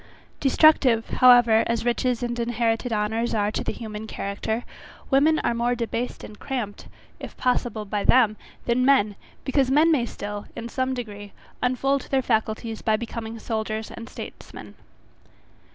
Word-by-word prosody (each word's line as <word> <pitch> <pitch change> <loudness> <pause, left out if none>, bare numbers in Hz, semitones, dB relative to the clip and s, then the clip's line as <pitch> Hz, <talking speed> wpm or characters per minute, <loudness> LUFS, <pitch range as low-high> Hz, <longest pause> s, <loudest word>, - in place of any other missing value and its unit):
Destructive, 270 -5 +4
however, 240 -3 +6
as 230 0 -1
riches 245 0 0
and 240 0 -2
inherited 235 0 0
honours 220 +2 -1
are 205 -1 +1
to - - -3
the - - -2
human 220 -1 -7
character, 220 +3 -3 0.5
women 300 +4 +4
are - - +1
more 240 +1 0
debased 235 +1 -3
and 210 - -11
cramped, 240 -7 -5 0.3
if - - -9
possible 240 -3 -1
by 205 0 -2
them, 235 -4 +4 0.3
than 240 +1 +2
men, 255 -7 +3 0.3
because 265 -1 +1
men 305 +5 +4
may 250 -7 +2
still, 205 -1 -6
in 235 0 -6
some 260 +1 -1
degree, 205 -4 -7 0.3
unfold 265 +2 0
their 265 -1 +1
faculties 220 -1 -1
by 220 -1 +2
becoming 230 0 -6
soldiers 220 -1 -3
and 230 - -9
statesmen. - - -10
235 Hz, 150 wpm, -24 LUFS, 220-255 Hz, 0.5 s, however